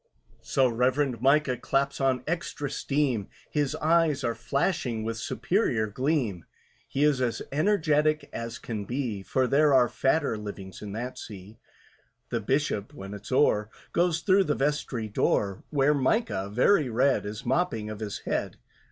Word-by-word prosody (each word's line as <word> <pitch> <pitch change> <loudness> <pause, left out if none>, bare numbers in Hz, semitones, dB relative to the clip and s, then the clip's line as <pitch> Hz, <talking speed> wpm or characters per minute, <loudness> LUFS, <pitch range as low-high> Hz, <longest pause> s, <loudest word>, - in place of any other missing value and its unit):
So 135 -1 +2
REVEREND 125 +1 +1
MICAH 135 -1 +3
claps 140 0 0
on 130 -2 +1
extra 155 -4 -3
steam, 135 -8 0 0.2
His 150 -1 0
eyes 155 -3 +2
are 115 - 0
flashing 130 - -1
with 115 0 -3
superior 120 - 0
gleam, 120 - -1 0.4
He 140 - 0
is 145 -3 +3
as 120 -2 -1
energetic 155 -3 +2
as 115 0 -5
can 105 -4 -5
be, 120 -4 -3
For 130 +6 0
there 140 +2 +4
are 125 -2 +5
fatter 135 -3 0
livings 100 -2 -8
in 105 -1 -6
that 120 +4 -5
see. 105 +1 -10 0.7
The - - -1
Bishop, 135 -7 -1
when 100 +1 -8
it's 105 +3 -9
o'er, 105 -6 +3 0.2
Goes 170 -1 +2
through 195 +1 +4
the 150 - 0
vestry 135 -5 -1
door, 100 -1 0
Where 145 0 +3
MICAH, 135 - 0
very 130 - +3
red, 130 +4 +2
Is 105 +1 -6
mopping 120 -6 0
of 105 - -7
his 105 -2 -5
head. - - -2
130 Hz, 150 wpm, -27 LUFS, 110-150 Hz, 0.7 s, are